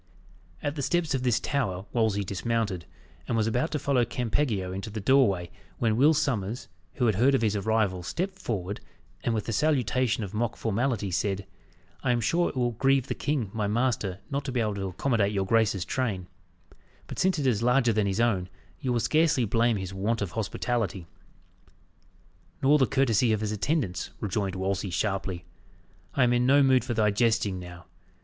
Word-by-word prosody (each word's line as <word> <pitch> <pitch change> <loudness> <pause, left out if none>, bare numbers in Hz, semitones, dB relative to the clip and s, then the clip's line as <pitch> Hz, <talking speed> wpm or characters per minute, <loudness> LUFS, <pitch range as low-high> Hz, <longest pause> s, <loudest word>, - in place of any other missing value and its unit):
At 145 - -1
the 145 - -4
steps 170 +2 0
of 130 - 0
this 125 -2 +2
tower 100 -11 -2
Wolsey 110 -4 +1
dismounted, 100 -1 -2 0.4
and 115 - 0
was 110 - +2
about 120 +8 0
to 155 - -1
follow 140 -3 +2
Campeggio 115 -6 -1
into 100 +3 -5
the 110 +1 -5
doorway, 100 -7 +3 0.3
when 110 -2 +1
Will 145 +7 +5
Sommers, 125 -6 -1 0.3
who 125 - 0
had 110 - +3
heard 130 +8 +4
of 125 - +1
his 105 -1 +2
arrival, 100 -3 +1
stepped 190 - -3
forward, 100 -3 -3 0.4
and 115 - 0
with 110 - -3
a - - -1
salutation 130 -3 +1
of 100 0 -6
mock 115 +2 -1
formality, 110 -2 -1
said, 95 +2 -1 0.6
"I 125 - +1
am 120 - +1
sure 170 +10 +1
it - - -9
will 120 -1 +1
grieve 135 +2 +2
the - - +1
king, 130 -9 -2
my 105 -2 -1
master, 110 -4 0
not 140 +1 -1
to 135 - -3
be 125 - -1
able 110 -2 0
to 100 -1 -3
accommodate 105 +1 0
your 100 -1 0
grace's 105 -3 +2
train; 110 -9 -2 0.8
but - - -7
since 185 -1 +2
it 145 - -1
is 115 -5 +2
larger 125 0 +3
than 105 -1 +1
his 95 +2 -1
own, 100 -6 +1 0.3
you 130 - -2
will 120 - +2
scarce 155 +3 +3
blame 115 +1 +2
his 95 -1 -5
want 105 +3 -1
of 95 - -5
hospitality." 110 -3 -2 1.6
"Nor 145 +3 +5
the 130 - +4
courtesy 125 -4 +2
of 110 - -1
his 105 -1 -1
attendants," 110 - -1
rejoined 100 -2 -2
Wolsey 95 +1 -2
sharply. 95 0 -2 0.7
"I 140 - +4
am 120 0 +3
in 120 +1 +2
no 140 +1 +6
mood 130 -2 +4
for 120 -2 -3
thy 105 -1 +3
jesting 110 -3 +1
now. 90 -1 -10
115 Hz, 190 wpm, -27 LUFS, 100-130 Hz, 1.6 s, no